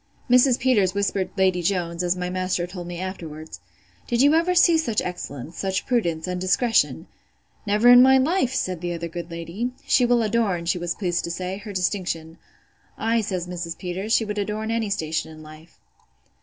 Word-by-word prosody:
Mrs. 250 Hz, 0 st, +5 dB
Peters 205 Hz, -7 st, +2 dB
whispered 200 Hz, -2 st, 0 dB
Lady 185 Hz, -2 st, +2 dB
Jones, 170 Hz, -1 st, -1 dB
as 180 Hz, 0 st, +1 dB
my 180 Hz, 0 st, -3 dB
master 185 Hz, -1 st, -1 dB
told 175 Hz, -1 st, -8 dB
me 175 Hz, -1 st, -6 dB
afterwards; 160 Hz, -, -7 dB, 0.5 s
Did 235 Hz, -, 0 dB
you 290 Hz, +2 st, +5 dB
ever 335 Hz, +3 st, +2 dB
see 345 Hz, -1 st, +6 dB
such 230 Hz, -9 st, 0 dB
excellence, 160 Hz, -3 st, -6 dB
such 190 Hz, 0 st, -2 dB
prudence, 170 Hz, -11 st, 0 dB
and 180 Hz, 0 st, -4 dB
discretion? 225 Hz, +6 st, +1 dB, 0.6 s
Never 210 Hz, +4 st, +3 dB
in 245 Hz, 0 st, +9 dB
my 265 Hz, +1 st, +6 dB
life, 265 Hz, 0 st, +1 dB
said 185 Hz, -9 st, -2 dB
the 175 Hz, -1 st, -3 dB
other 170 Hz, 0 st, -4 dB
good 170 Hz, 0 st, -7 dB
lady. 170 Hz, +9 st, -4 dB
She 245 Hz, -, +3 dB
will 240 Hz, -1 st, +3 dB
adorn, 210 Hz, -6 st, 0 dB
she 175 Hz, +1 st, 0 dB
was 175 Hz, 0 st, -3 dB
pleased 175 Hz, -4 st, -1 dB
to -, -, -5 dB
say, 185 Hz, +3 st, -4 dB
her 210 Hz, 0 st, -8 dB
distinction. 180 Hz, -4 st, -3 dB, 0.6 s
Ay, 225 Hz, +1 st, +1 dB
says 185 Hz, -4 st, -3 dB
Mrs. 175 Hz, -2 st, -5 dB
Peters, 190 Hz, +3 st, -5 dB
she 225 Hz, -, +3 dB
would 210 Hz, 0 st, -3 dB
adorn 215 Hz, +2 st, -3 dB
any 230 Hz, -2 st, -1 dB
station 160 Hz, -5 st, -2 dB
in 155 Hz, 0 st, -12 dB
life. 155 Hz, +2 st, -15 dB
185 Hz, 185 wpm, -23 LUFS, 175-225 Hz, 0.6 s, in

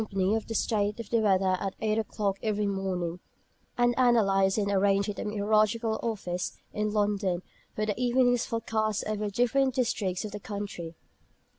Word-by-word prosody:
of 220 Hz, -1 st, -1 dB
the 225 Hz, -, -4 dB
state 210 Hz, 0 st, 0 dB
of 230 Hz, -, -7 dB
the 230 Hz, -, +3 dB
weather 190 Hz, -3 st, +3 dB
at 195 Hz, -1 st, -3 dB
eight 215 Hz, 0 st, +1 dB
o'clock 205 Hz, -3 st, -2 dB
every 210 Hz, -1 st, 0 dB
morning, 185 Hz, -3 st, -2 dB, 0.6 s
and 240 Hz, 0 st, +3 dB
analysed 195 Hz, -6 st, +4 dB
and 200 Hz, -1 st, +1 dB
arranged 200 Hz, +1 st, +2 dB
at 205 Hz, -, -4 dB
the -, -, -3 dB
Meteorological 215 Hz, +2 st, +1 dB
Office 180 Hz, -6 st, -3 dB, 0.2 s
in 210 Hz, 0 st, -1 dB
London 205 Hz, -4 st, 0 dB, 0.3 s
for 215 Hz, -, 0 dB
the 210 Hz, -, 0 dB
evening's 245 Hz, -1 st, +3 dB
forecasts 220 Hz, -2 st, -1 dB
over 215 Hz, 0 st, -2 dB
the 205 Hz, -, -3 dB
different 250 Hz, +4 st, +2 dB
districts 210 Hz, -6 st, -1 dB
of 210 Hz, -, -6 dB
the 210 Hz, -, -6 dB
country. 200 Hz, -5 st, -6 dB
210 Hz, 165 wpm, -28 LUFS, 195-225 Hz, 0.6 s, analysed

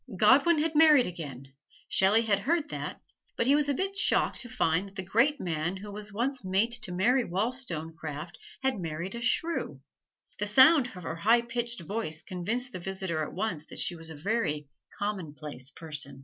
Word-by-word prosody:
Godwin 275 Hz, -, +5 dB
had 315 Hz, +1 st, +1 dB
married 300 Hz, -4 st, +7 dB
again 140 Hz, -6 st, -7 dB, 0.3 s
Shelley 205 Hz, +4 st, +4 dB
had 205 Hz, -3 st, +2 dB
heard 300 Hz, +7 st, 0 dB
that, -, -, -5 dB, 0.4 s
but 235 Hz, -, +1 dB
he 270 Hz, -, +5 dB
was 290 Hz, 0 st, +2 dB
a -, -, +3 dB
bit 390 Hz, +4 st, -1 dB
shocked 395 Hz, -, +2 dB
to 245 Hz, -, -7 dB
find 185 Hz, -6 st, +1 dB
that 195 Hz, -, -16 dB
the 190 Hz, -, -3 dB
great 240 Hz, +10 st, +2 dB
man 170 Hz, +1 st, -2 dB
who 205 Hz, +2 st, -8 dB
was 210 Hz, +1 st, -7 dB
once 250 Hz, +4 st, -2 dB
mate 190 Hz, +5 st, +1 dB
to 180 Hz, -, -7 dB
Mary 240 Hz, +9 st, +3 dB
Wollstonecraft 170 Hz, -, -3 dB, 0.3 s
had 265 Hz, -5 st, +1 dB
married 170 Hz, +2 st, -4 dB
a 235 Hz, -, -5 dB
shrew. 250 Hz, -, 0 dB, 0.6 s
The 210 Hz, -, 0 dB
sound 260 Hz, +5 st, +7 dB
of 180 Hz, -, -9 dB
her 165 Hz, -, -4 dB
high 225 Hz, +7 st, +4 dB
pitched 235 Hz, -2 st, -3 dB
voice 170 Hz, -3 st, -4 dB
convinced 225 Hz, +8 st, -3 dB
the 185 Hz, -, -6 dB
visitor 190 Hz, -3 st, -3 dB
at 155 Hz, -, -4 dB
once 180 Hz, -6 st, -3 dB
that -, -, -9 dB
she 175 Hz, -, -1 dB
was 165 Hz, -1 st, -7 dB
a 160 Hz, -, -8 dB
very 150 Hz, -5 st, -1 dB, 0.3 s
commonplace 155 Hz, -9 st, -4 dB
person. 150 Hz, -4 st, -6 dB
200 Hz, 185 wpm, -29 LUFS, 165-245 Hz, 0.6 s, married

